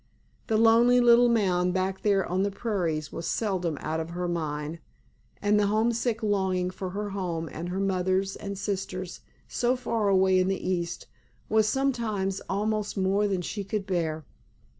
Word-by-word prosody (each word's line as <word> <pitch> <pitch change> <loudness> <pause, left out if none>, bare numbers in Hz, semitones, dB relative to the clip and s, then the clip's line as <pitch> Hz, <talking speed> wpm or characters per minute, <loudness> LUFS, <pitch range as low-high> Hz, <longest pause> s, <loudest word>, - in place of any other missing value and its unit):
The 220 - +2
lonely 230 +2 +5
little 240 0 +6
mound 180 -5 +2
back 190 +1 -1
there 200 -3 +2
on 185 +2 -1
the 200 - +1
prairies 175 -8 -2
was 165 - -5
seldom 180 -8 -1
out 160 +1 -2
of 160 0 -4
her 175 +1 -3
mind, 155 -1 -3 0.6
and 210 0 +2
the 205 - +3
homesick 225 +2 0
longing 190 -3 0
for 185 0 -5
her 205 +2 -4
home 175 -4 -3
and 170 +3 -5
her 185 +2 -2
mothers 190 0 0
and 200 -1 -6
sisters 190 -2 -4 0.3
so 245 +1 +1
far 230 -4 -1
away 190 -1 +4
in 185 - +2
the 190 -1 -2
East, 175 -2 -2 0.4
was 220 -1 +3
sometimes 215 -7 -1
almost 210 +1 -1
more 195 +2 +2
than 190 -3 -1
she 205 +3 -4
could 200 0 -3
bear. 160 -5 -2
195 Hz, 165 wpm, -27 LUFS, 180-215 Hz, 0.6 s, little